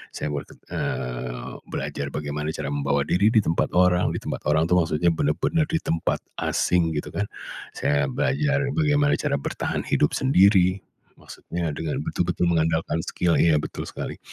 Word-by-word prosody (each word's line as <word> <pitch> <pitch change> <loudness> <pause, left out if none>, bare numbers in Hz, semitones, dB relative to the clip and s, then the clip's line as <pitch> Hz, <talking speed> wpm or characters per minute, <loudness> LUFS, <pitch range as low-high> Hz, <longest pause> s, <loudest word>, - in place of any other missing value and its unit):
Saya 75 - -3
berket 75 -1 -6 0.2
eee, 60 -1 -4
belajar 70 - -4
bagaimana 75 +1 -3
cara - - -4
membawa 70 0 +1
diri 100 +4 +3
di 110 - +5
tempat 85 -3 0
orang. 90 0 +4
Di - - -2
tempat - - -3
orang 80 +1 +3
tu - - +6
maksudnya 80 0 +2
benar-benar 85 - +1
di 165 - +1
tempat 80 0 0 0.2
asing, 85 -2 +1
gitu 75 - -3
kan. 100 - -1 0.5
Saya 70 -1 +1
belajar 145 - +1
bagaimana 145 -2 +3
cara - - 0
bertahan - - -3
hidup 75 - +2
sendiri, 95 -7 +4 0.4
maksudnya 85 -2 -5
dengan 80 -1 -3
betul-betul 90 0 0
mengandalkan 80 -1 +1
skill 85 -2 +1
iya, 85 -2 +5
betul - - -5
sekali. - - -6
85 Hz, 155 wpm, -24 LUFS, 75-95 Hz, 0.5 s, tu